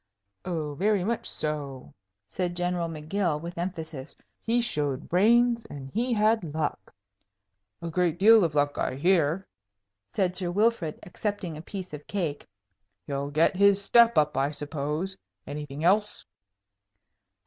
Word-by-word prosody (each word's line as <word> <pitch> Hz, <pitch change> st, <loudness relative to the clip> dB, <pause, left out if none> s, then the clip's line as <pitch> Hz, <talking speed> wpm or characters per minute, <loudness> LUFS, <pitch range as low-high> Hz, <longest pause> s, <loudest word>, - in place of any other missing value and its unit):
"Oh, 155 Hz, -4 st, -3 dB
very 200 Hz, +4 st, +1 dB
much 230 Hz, +4 st, -2 dB
so," 145 Hz, -4 st, -4 dB, 0.3 s
said 175 Hz, -, -3 dB
General 175 Hz, -1 st, -1 dB
M'Gill, 160 Hz, +1 st, -1 dB
with 170 Hz, +2 st, -7 dB
emphasis. 160 Hz, -5 st, -5 dB, 0.3 s
"He 235 Hz, +2 st, +1 dB
showed 150 Hz, -, -1 dB
brains, 235 Hz, +5 st, +4 dB
and 135 Hz, -2 st, -8 dB
he 245 Hz, +4 st, -1 dB
had 215 Hz, -8 st, +2 dB
luck." 150 Hz, -11 st, -3 dB, 0.9 s
"A 170 Hz, -, -3 dB
great 175 Hz, -1 st, +1 dB
deal 220 Hz, +2 st, +7 dB
of 160 Hz, -3 st, -1 dB
luck, 145 Hz, 0 st, +1 dB
I -, -, -1 dB
hear," 170 Hz, +3 st, +2 dB, 0.7 s
said 185 Hz, -2 st, 0 dB
Sir 180 Hz, -2 st, -1 dB
Wilfrid, 205 Hz, -4 st, +1 dB
accepting 200 Hz, -2 st, -4 dB
a 155 Hz, -, -7 dB
piece 185 Hz, 0 st, -7 dB
of 150 Hz, 0 st, -8 dB
cake. 165 Hz, -8 st, -3 dB, 0.6 s
"He'll 140 Hz, 0 st, -3 dB
get 155 Hz, +5 st, +2 dB
his 200 Hz, +1 st, +5 dB
step 235 Hz, +3 st, +5 dB
up, 150 Hz, -1 st, +3 dB
I 135 Hz, +1 st, +1 dB
suppose. 150 Hz, +5 st, -4 dB, 0.3 s
Anything 145 Hz, 0 st, -6 dB
else?" 205 Hz, +4 st, +2 dB
175 Hz, 135 wpm, -27 LUFS, 150-200 Hz, 0.9 s, deal